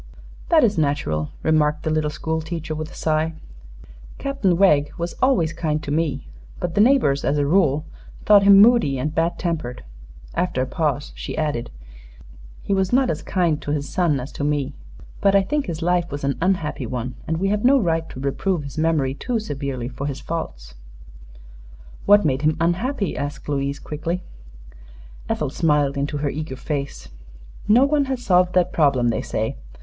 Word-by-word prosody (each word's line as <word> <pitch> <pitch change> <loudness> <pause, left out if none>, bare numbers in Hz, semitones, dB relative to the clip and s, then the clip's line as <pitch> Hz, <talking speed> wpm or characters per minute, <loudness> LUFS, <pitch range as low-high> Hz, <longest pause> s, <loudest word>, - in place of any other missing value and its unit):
"That 320 -4 +5
is 210 -7 +2
natural," 140 - -1
remarked 155 -1 +2
the 155 - -1
little 155 -1 +1
school 160 +2 -3
teacher, 160 -1 -5
with 155 0 -5
a - - -13
sigh. 160 +1 0 0.8
"Captain 275 -11 0
Wegg 150 -7 +4
was 170 +1 -3
always 180 - +2
kind 155 -2 -2
to 145 - -4
me; 150 -4 -1 0.3
but 170 - -3
the 205 - +3
neighbors 220 - +3
as 145 - +1
a 145 - +1
rule 155 -2 +2 0.4
thought 205 -1 +7
him 200 0 +7
moody 215 - +5
and 150 +4 -2
bad 165 +1 0
tempered." 160 -8 -3 0.5
After 170 -7 0
a - - -2
pause 145 0 -2
she - - -6
added: 150 -7 -2 0.9
"He - - -1
was 190 -1 +1
not 255 0 +3
as - - -4
kind 170 -5 0
to - - -7
his 145 -1 -1
son 160 -2 +1
as 130 +3 -7
to - - -5
me. 145 -2 -1 0.5
But 200 0 +4
I 195 - +5
think 295 +6 -1
his 165 -1 -4
life 175 0 +1
was 145 0 -6
an 140 0 0
unhappy 165 -8 -1
one, 125 +1 -4
and 160 - -1
we 195 +3 0
have 210 +1 0
no 270 +3 +6
right 165 -5 0
to - - -9
reprove 150 +5 -1
his 140 +2 -7
memory 155 -5 +1
too 240 - -2
severely 140 - -4
for 135 +3 -5
his 140 -1 -4
faults." 60 - -6 1.3
"What 205 -2 +6
made 135 -2 +1
him 155 0 +1
unhappy?" 195 - 0
asked 145 +1 -5
Louise, 140 -1 -1
quickly. 165 +5 -4 1.1
Ethel 150 -3 -1
smiled 150 -3 +1
into 145 +1 -2
her 145 0 -1
eager 155 -2 -5
face. 140 +1 -5 0.6
"No 235 +6 +6
one 285 0 +2
has 265 -2 -3
solved 180 -1 +3
that 180 -1 +2
problem, 140 -6 +3
they 115 - -1
say. - - -3
155 Hz, 180 wpm, -22 LUFS, 140-185 Hz, 1.3 s, thought